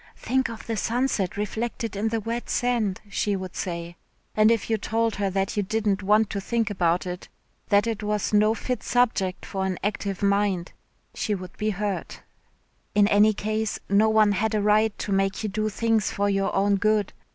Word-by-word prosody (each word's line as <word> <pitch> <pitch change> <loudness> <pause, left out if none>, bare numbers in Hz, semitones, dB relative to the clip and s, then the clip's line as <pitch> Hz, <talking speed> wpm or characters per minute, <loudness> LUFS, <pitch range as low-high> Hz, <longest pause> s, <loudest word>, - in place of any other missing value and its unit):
"Think 260 0 0
of 230 -1 -8
the 225 - -2
sunset 225 -5 0
reflected 220 +1 -3
in 205 +3 0
the 225 0 0
wet 230 +3 -4
sand," 235 -6 0
she 200 0 -1
would 185 -1 -6
say, 170 -1 -4 0.4
and 215 0 +5
if 230 -2 +1
you 220 -1 0
told 225 +1 0
her 200 -1 0
that 195 +3 -1
you 205 - +1
didn't 205 -1 0
want 210 +2 +3
to 200 - -3
think 225 +1 -1
about 175 -2 +1
it, 180 0 -6 0.4
that 205 +1 +4
it 225 -2 -2
was 210 0 -1
no 215 +1 +4
fit 250 0 -3
subject 220 -7 0
for 195 -2 -3
an 190 -1 -1
active 200 -1 -2
mind, 200 -3 +1 0.4
she 210 - -1
would 185 -1 -9
be 215 - -1
hurt. 205 -1 -4 0.7
In 205 -1 +5
any 210 +1 +5
case 215 +1 -2
no 205 +2 +4
one 215 -1 +4
had 215 +3 0
a 210 - +1
right 210 +1 +3
to 205 - -4
make 195 +1 0
you 215 - -1
do 215 +2 -1
things 225 -1 +1
for 200 0 0
your 195 -1 +1
own 200 +1 +3
good. 215 0 +1
210 Hz, 195 wpm, -25 LUFS, 195-220 Hz, 0.7 s, and